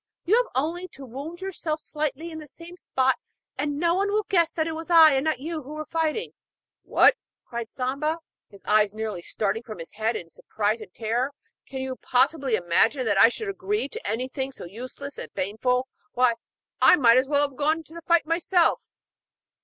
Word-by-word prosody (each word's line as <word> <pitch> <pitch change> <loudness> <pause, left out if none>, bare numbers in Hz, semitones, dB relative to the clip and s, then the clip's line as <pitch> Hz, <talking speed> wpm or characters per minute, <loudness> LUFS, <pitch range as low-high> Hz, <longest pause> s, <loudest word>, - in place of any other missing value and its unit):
You 385 +6 +4
have - - +2
only 330 +7 -1
got - - -43
to 270 0 -10
wound 285 +8 -8
yourself 340 -5 -3
slightly 305 +2 -3
in 315 - -7
the 305 - -10
same 335 +4 -11
spot 265 -6 0 0.4
and 290 +1 -2
no 340 +2 +2
one 400 +3 +1
will 425 +1 +1
guess 340 -5 +3
that 315 - -1
it 325 - -3
was 325 +2 -7
I 325 -3 +8
and 270 0 +1
not 315 -4 0
you 320 +1 -4
who 295 +3 -9
were 310 0 -5
fighting.' 325 +7 -1 0.5
'What!' - - +5 0.3
cried 235 -1 -5
Samba, 275 +6 -1 0.3
his 200 -2 -16
eyes 210 -1 +3
nearly 215 -5 -4
starting 210 +4 -2
from 220 -4 -9
his 165 -1 -9
head 220 +2 -1
in 165 -4 -6
surprise 215 +5 -2
and 200 -4 -10
terror. 240 +7 -1 0.3
'Can 265 -1 -5
you 260 -1 -4
possibly 265 -1 +2
imagine 220 +9 +2
that 205 -3 +2
I 230 - +8
should 425 - -4
agree 390 -3 -2
to - - -7
anything 260 +4 -2
so 270 - -9
useless 255 +8 -8
and - - -7
painful? 235 +7 0 0.3
Why, 250 -1 +4 0.5
I - - +8
might 240 -6 +5
as 260 +1 +3
well 290 0 +3
have 275 - -17
gone 310 +4 +1
to 330 +2 -11
fight 340 -2 +4
myself!' 335 +1 +1
275 Hz, 200 wpm, -25 LUFS, 235-325 Hz, 0.5 s, I